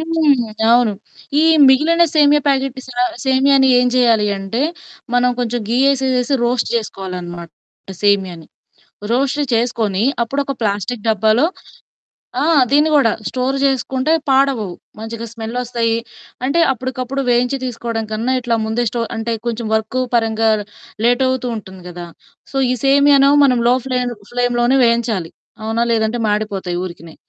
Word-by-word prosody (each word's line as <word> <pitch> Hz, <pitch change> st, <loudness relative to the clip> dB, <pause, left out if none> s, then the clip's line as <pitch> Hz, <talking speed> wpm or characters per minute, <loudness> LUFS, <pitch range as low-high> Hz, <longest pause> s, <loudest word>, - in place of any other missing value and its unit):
హ్మ్. 310 Hz, -8 st, +1 dB, 0.2 s
అవును 240 Hz, -3 st, +3 dB, 0.5 s
ఈ -, -, +3 dB, 0.3 s
మిగిలిన 320 Hz, +6 st, +4 dB
సేమియా 295 Hz, -1 st, +4 dB
ప్యాకెట్‌ 270 Hz, -1 st, 0 dB
సా 245 Hz, 0 st, -2 dB, 0.2 s
సేమియాని 265 Hz, 0 st, +3 dB
ఏం 250 Hz, -, +2 dB
చేయాలి 230 Hz, -4 st, +3 dB
అంటే 195 Hz, +7 st, -3 dB, 0.5 s
మనం 250 Hz, 0 st, +3 dB
కొంచెం 240 Hz, 0 st, -2 dB
ఘీ 245 Hz, -, +1 dB
యేసేసేసి 265 Hz, 0 st, +1 dB
రోస్ట్ 240 Hz, 0 st, 0 dB
చేసుకోవాలనమాట 180 Hz, -5 st, -5 dB, 0.5 s
సేమియాని. 190 Hz, -5 st, 0 dB, 0.7 s
రోస్ట్ 275 Hz, +4 st, 0 dB
చేసుకొని 225 Hz, -4 st, 0 dB, 0.2 s
అప్పుడొక 275 Hz, +3 st, -3 dB
ప్లాస్టిక్ 210 Hz, +2 st, -2 dB
డబ్బాలో 220 Hz, +6 st, +2 dB, 1.0 s
ఆ! -, -, +1 dB, 0.3 s
దీన్ని 295 Hz, +2 st, +4 dB
గూడా 275 Hz, -7 st, +4 dB, 0.2 s
స్టోర్ 260 Hz, +1 st, -2 dB
చేసుకుంటే 265 Hz, +2 st, 0 dB, 0.2 s
పాడవవు. 265 Hz, -8 st, +1 dB, 0.3 s
మంచిగా 225 Hz, +1 st, -6 dB
స్మెల్లొస్తాయి. 230 Hz, 0 st, -2 dB, 0.5 s
అంటే 280 Hz, +6 st, +1 dB
అప్పడికప్పుడు 260 Hz, +1 st, -4 dB
వేయించి 245 Hz, +2 st, +1 dB
తీసుకోవడం 235 Hz, -2 st, -4 dB
కన్నా 230 Hz, +4 st, -1 dB
ఇట్లా 235 Hz, -2 st, -1 dB
ముందే 225 Hz, +2 st, -1 dB
స్టో 235 Hz, +1 st, -3 dB
అంటే 225 Hz, +1 st, -3 dB
కొంచెం 235 Hz, -1 st, -3 dB
వర్క్ 220 Hz, +3 st, -1 dB, 0.2 s
పరంగా 225 Hz, -1 st, +1 dB, 0.5 s
లేటవుతూ 255 Hz, +1 st, +1 dB
ఉంటుంది 190 Hz, -3 st, -11 dB
కదా! 175 Hz, 0 st, -8 dB, 0.5 s
సో 275 Hz, -, -4 dB
ఈ -, -, +2 dB
సేమియా‌నో 280 Hz, 0 st, +5 dB
మనం 250 Hz, -3 st, +3 dB
లో 245 Hz, -, +5 dB
ఫ్లేన్ 250 Hz, -1 st, -1 dB, 0.2 s
ఫ్లేమ్‌లోనే 245 Hz, +1 st, +1 dB
వేయించాలి. 230 Hz, -7 st, 0 dB, 0.3 s
అవునా, 225 Hz, +2 st, 0 dB
లేదంటే 220 Hz, +1 st, 0 dB
మాడిపోతాయి 205 Hz, -4 st, -2 dB
ఊరికినే. 170 Hz, -3 st, -9 dB
240 Hz, 130 wpm, -17 LUFS, 220-265 Hz, 1.0 s, సేమియా‌నో